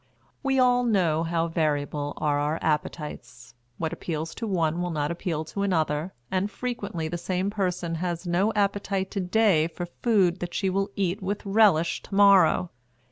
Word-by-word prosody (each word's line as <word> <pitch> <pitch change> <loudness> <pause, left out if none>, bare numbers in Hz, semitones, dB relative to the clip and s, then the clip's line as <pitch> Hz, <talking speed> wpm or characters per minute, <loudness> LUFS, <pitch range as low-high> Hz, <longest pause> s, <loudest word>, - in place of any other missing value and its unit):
We 270 -1 +1
all 250 -1 +4
know 180 -9 +2
how 165 0 0
variable 145 -3 -1
are 145 -1 +1
our 150 +2 0
appetites. 125 -6 -3 0.2
What 160 0 -2
appeals 160 -1 -4
to 225 - -5
one 170 -3 0
will 180 - -1
not 150 -2 -1
appeal 170 -2 -3
to 200 +6 -5
another, 160 -3 0 0.2
and 190 +2 0
frequently 205 -9 -4
the 175 +2 -4
same 185 +3 -1
person 180 -4 -2
has 175 0 -3
no 180 +5 +1
appetite 200 -1 0
to 200 - -2
day 185 -4 +3
for 175 +1 -6 0.2
food 195 -7 +3
that 175 0 -5
she 190 -2 0
will 195 +1 0
eat 195 +1 -1
with 200 +2 -3
relish 195 -5 +3
to 195 - -8
morrow. 195 -3 +5
180 Hz, 170 wpm, -26 LUFS, 160-200 Hz, 0.2 s, morrow